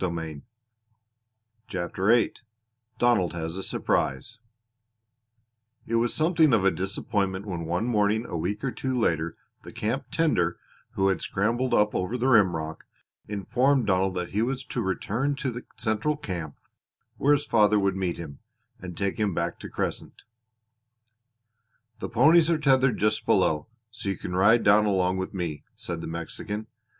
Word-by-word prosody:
CHAPTER 95 -1 -3
VIII 115 +1 +4 0.6
DONALD 110 -9 +2
HAS 80 0 -4
A 95 - -4
SURPRISE 95 - -1 1.5
It 115 - -6
was 115 +1 +2
something 160 -3 +3
of 105 -4 +3
a 95 - +5
disappointment 95 0 -2
when 85 -5 -4
one 90 +6 -1
morning 110 -1 +1
a - - -6
week 100 +7 -3
or 135 - 0
two 130 0 -3
later 85 -7 0 0.2
the - - -11
camp 125 +6 -2
tender, 95 - +1 0.4
who 95 0 +2
had 95 -3 0
scrambled 120 +6 0
up 105 0 +3
over 100 +7 -1
the 125 - -2
rimrock, 85 -9 +2 0.4
informed 125 +6 +1
Donald 95 -1 +1
that 90 -1 -3
he 105 - 0
was 130 +3 -1
to 120 - -3
return 110 +8 -1
to 135 -2 -2
the 120 +1 -8
central 110 +7 0
camp 85 - -5 0.6
where 145 +2 +4
his 145 0 +1
father 105 -4 +4
would 100 -2 +1
meet 95 -3 -2
him, 75 -5 -8 0.4
and 90 -2 -8
take 100 +2 -2
him 105 -5 0
back - - -2
to - - -8
Crescent. - - -4 1.8
"The - - -4
ponies 155 +7 +5
are 165 - +3
tethered 135 -4 +3
just 105 +1 0
below, 75 -1 +2 0.2
so 110 -3 -5
you 95 - -2
can 90 - -5
ride 105 +5 +5
down 105 +1 +5
along 95 -2 +1
with 95 +1 -4
me," 85 -5 -4
said - - -5
the - - -6
Mexican. 85 +6 -5
105 Hz, 155 wpm, -26 LUFS, 90-120 Hz, 1.8 s, a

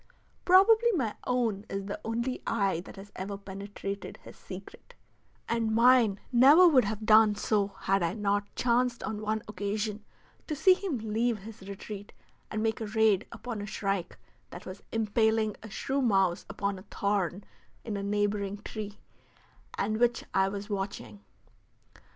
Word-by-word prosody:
Probably 440 +6 +6
my 250 - 0
own 230 -5 0
is 195 0 -4
the 200 - -5
only 235 +3 -2
eye 195 -6 +1
that - - -11
has 200 +1 -11
ever 195 +2 -5
penetrated 200 0 -7
his - - -12
secret, 190 0 -11 0.5
and 225 -1 0
mine 235 -4 +5
never 280 +9 +8
would 265 -8 +5
have 215 +1 -4
done 215 -1 +6
so 205 -1 +1
had 195 0 +2
I 170 +1 0
not 205 -1 0
chanced 245 0 +1
on 215 -1 -4
one 215 0 -2
occasion 210 +1 -3 0.4
to 305 - -2
see 370 +6 +6
him 365 -7 -3
leave 225 +1 0
his 210 -2 -10
retreat 200 +1 -8 0.4
and 215 0 -2
make 225 0 -1
a 220 - -3
raid 215 -2 +2
upon 235 -4 -6
a 205 - -6
shrike 195 -3 -2 0.3
that 175 - -10
was 185 +1 -8
impaling 220 -1 +1
a 215 - -9
shrew 270 +7 -2
mouse 195 -7 +2
upon 200 -1 -2
a - - -13
thorn 200 -2 -1 0.4
in 220 -3 -4
a 200 - -3
neighboring 205 0 -1
tree 210 -1 -6 0.8
and 215 +2 -1
which 240 0 +2
I 190 0 +3
was 200 0 -6
watching. 195 - -5
210 Hz, 155 wpm, -29 LUFS, 200-230 Hz, 0.8 s, never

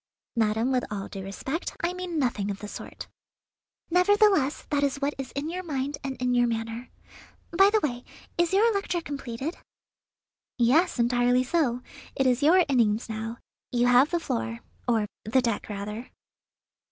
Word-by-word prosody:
"Madam, 225 +2 +1
with 255 -1 +1
all 200 -2 -4
due 195 - -7
respect, 265 - -4
I 345 +1 +1
mean 365 -2 -4
nothing 235 -8 0
of 200 - -3
the 210 - -8
sort." - - -8 0.8
"Nevertheless, 360 -5 +3
that 290 -1 +2
is 280 -1 +1
what 285 +1 0
is 270 - -5
in 285 +2 -3
your 360 +3 -3
mind 285 -4 -3
and 270 -1 -4
in 250 0 +1
your 245 0 +4
manner. 225 +1 -4 0.7
By 390 +3 +7
the 435 0 +2
way, 245 -4 -2 0.3
is 345 -1 +2
your 435 +4 +4
lecture 395 -3 -1
completed?" 280 0 -5 1.0
"Yes, 275 +9 +3
entirely 245 +1 +3
so. 255 -4 0 0.3
It 270 - +1
is 255 +1 +3
your 345 +5 +5
innings 230 -4 +2
now. 225 +1 -4 0.3
You 245 0 +2
have 250 +4 +5
the 345 - 0
floor, 115 - -3 0.3
or 225 -3 +2 0.2
the 235 +5 +2
deck 230 -4 -1
rather." 210 +3 -5
255 Hz, 165 wpm, -27 LUFS, 230-320 Hz, 1.0 s, By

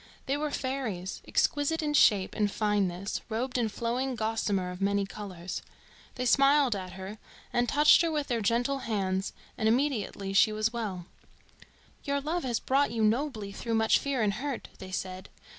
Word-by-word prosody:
They 270 - 0
were 300 +1 -1
fairies, 255 -10 -3
exquisite 305 +3 +1
in 295 -1 0
shape 205 -9 +4
and 210 -1 +1
fineness, 200 -3 -1
robed 245 +3 -2
in 225 -2 +1
flowing 245 +4 -2
gossamer 215 -4 -1
of 180 +1 -9
many 200 0 +2
colours. 185 -2 -6 0.5
They 250 - -2
smiled 275 -1 +4
at 185 -2 -6
her, 190 +3 -8 0.3
and 240 0 +2
touched 295 +2 +6
her 335 - +1
with 300 -2 -1
their 235 -4 -1
gentle 240 +6 +1
hands, 195 -5 -1 0.3
and 220 - +3
immediately 225 -6 0
she 200 +2 +5
was 215 +2 0
well. 200 -7 -4 1.0
"Your 280 -1 0
love 315 +4 -2
has 240 -3 0
brought 275 +2 +2
you 225 -1 -1
nobly 220 -2 0
through 230 +3 -3
much 220 0 +4
fear 275 -5 -1
and 205 -1 +2
hurt," 265 +4 -4
they 185 - -8
said. 185 0 -5
225 Hz, 170 wpm, -29 LUFS, 200-270 Hz, 1.0 s, touched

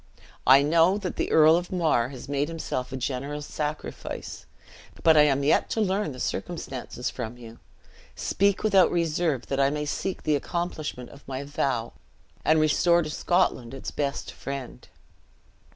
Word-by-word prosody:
I 135 +2 +8
know 165 +5 +4
that 190 -3 -5
the - - -1
Earl 155 +1 +7
of 175 +1 -2
Mar 160 -10 +1
has 130 -1 -9
made 145 +1 0
himself 155 -6 -4
a 130 - -4
generous 140 +3 -3
sacrifice, 150 0 -5 0.6
but 160 -1 +6
I 150 - +8
am 140 -1 +2
yet 145 - +3
to - - -1
learn 195 -4 0
the 130 - -9
circumstances 130 -8 -4
from 120 -1 -6
you. 115 -1 -12 0.6
Speak 200 0 +1
without 195 -4 +5
reserve, 165 -5 0
that 135 - -2
I 135 0 +4
may 150 +1 -2
seek 185 +5 -3
the 150 - +2
accomplishment 155 -5 -4
of 140 - -16
my 135 +1 -4
vow, 135 -5 -2 0.5
and 155 0 +4
restore 170 +3 +3
to 155 - -5
Scotland 150 -8 0
its 135 - -6
best 140 -2 -3
friend!" 135 -3 -7
150 Hz, 160 wpm, -26 LUFS, 135-170 Hz, 0.6 s, I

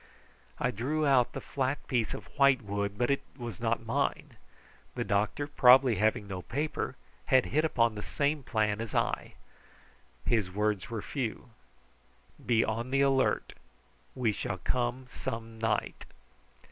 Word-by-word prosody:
I 125 - 0
drew 140 +8 -1
out 130 -4 +4
the - - -4
flat 135 +1 -2
piece 120 -5 0
of - - -8
white 140 -3 +5
wood, 100 0 -3
but 120 +3 +1
it 140 - +1 0.2
was 120 - -6
not - - -1
mine. - - -1 0.6
The - - -1
doctor, 105 +8 0
probably 130 -4 +6
having 105 -1 +1
no 95 -2 -5
paper, 150 - -3 0.3
had 130 -1 +4
hit 155 +2 +1
upon 115 -8 +2
the 105 - -6
same 145 +5 -1
plan 110 -4 0
as 115 - -5
I. - - -1 0.9
His 110 -6 +1
words 105 0 -1
were 115 -3 -4
few. 125 -1 -4 0.9
"Be 115 -2 +3
on 115 +3 -2
the 135 +1 +2
alert. 135 -1 +2 0.6
We 125 -4 +1
shall 95 -2 -3
come 125 +5 -1
some 115 -2 -6
night." 110 -2 -1
120 Hz, 145 wpm, -30 LUFS, 110-135 Hz, 0.9 s, probably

